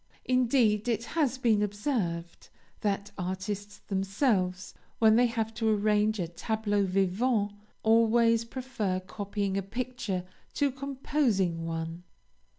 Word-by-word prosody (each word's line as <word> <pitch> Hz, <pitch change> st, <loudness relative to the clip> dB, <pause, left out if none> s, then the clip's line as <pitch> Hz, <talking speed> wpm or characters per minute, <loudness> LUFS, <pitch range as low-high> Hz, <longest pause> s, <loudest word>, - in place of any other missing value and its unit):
Indeed, 245 Hz, -4 st, +3 dB
it 230 Hz, -2 st, 0 dB
has 285 Hz, -6 st, +1 dB
been 225 Hz, -5 st, +3 dB
observed, 205 Hz, -5 st, -2 dB, 0.3 s
that 200 Hz, -1 st, -1 dB
artists 190 Hz, +3 st, -4 dB
themselves, 195 Hz, -2 st, 0 dB, 0.2 s
when 220 Hz, -1 st, +5 dB
they 245 Hz, +1 st, +5 dB
have 225 Hz, -1 st, -2 dB
to 225 Hz, 0 st, 0 dB
arrange 210 Hz, 0 st, +2 dB
a 175 Hz, -, -1 dB
tableau 205 Hz, +3 st, -1 dB
vivant, 200 Hz, +4 st, +1 dB, 0.3 s
always 230 Hz, +1 st, +4 dB
prefer 230 Hz, -6 st, -3 dB
copying 200 Hz, +1 st, -3 dB
a -, -, +1 dB
picture 235 Hz, -2 st, -3 dB, 0.3 s
to 285 Hz, -1 st, +2 dB
composing 255 Hz, -, 0 dB
one. 165 Hz, +1 st, -4 dB
210 Hz, 115 wpm, -29 LUFS, 195-235 Hz, 0.3 s, when